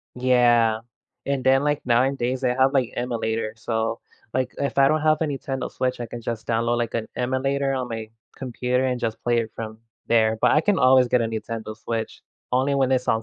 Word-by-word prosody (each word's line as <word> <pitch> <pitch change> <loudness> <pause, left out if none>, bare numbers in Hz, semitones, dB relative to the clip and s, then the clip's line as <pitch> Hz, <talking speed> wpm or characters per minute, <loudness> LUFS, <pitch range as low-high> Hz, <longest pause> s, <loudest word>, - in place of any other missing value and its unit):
Yeah, 120 -3 +3 0.5
and 140 -2 -1
then 135 +2 +4
like, 150 0 +1
9 130 +3 +3
days, 125 +1 -1
they 125 - +2
have, 130 +2 +3
like, 130 -3 +1
emulator. 115 -2 -2
So, 115 0 -2 0.3
like, 130 -1 0
if 140 0 -2
I 135 0 +6
don't 155 +2 +2
have 155 0 +3
a - - +2
Nintendo 135 -2 -3
Switch, 130 -1 -2
I 120 - -3
can 120 +1 -8
just 115 -1 -5
download, 115 +1 +1
like, 120 - -2
an 115 -1 -2
emulator 135 +2 0
on 130 -2 -2
my 110 -1 -6 0.3
computer 125 0 -1
and 125 -1 -1
just 110 -1 -3
play 120 -1 +2
it 115 -1 -2
from 110 -1 -7 0.3
there, 110 -1 +3
but - - +4
I 155 - +4
can 200 +3 +1
always 130 -1 +5
get 125 0 +3
a - - 0
Nintendo 110 0 -5
Switch, 115 0 -4 0.3
only 130 +3 +1
when 135 -1 +2
it's 125 -1 0
on 110 -2 +2
125 Hz, 215 wpm, -23 LUFS, 115-130 Hz, 0.5 s, I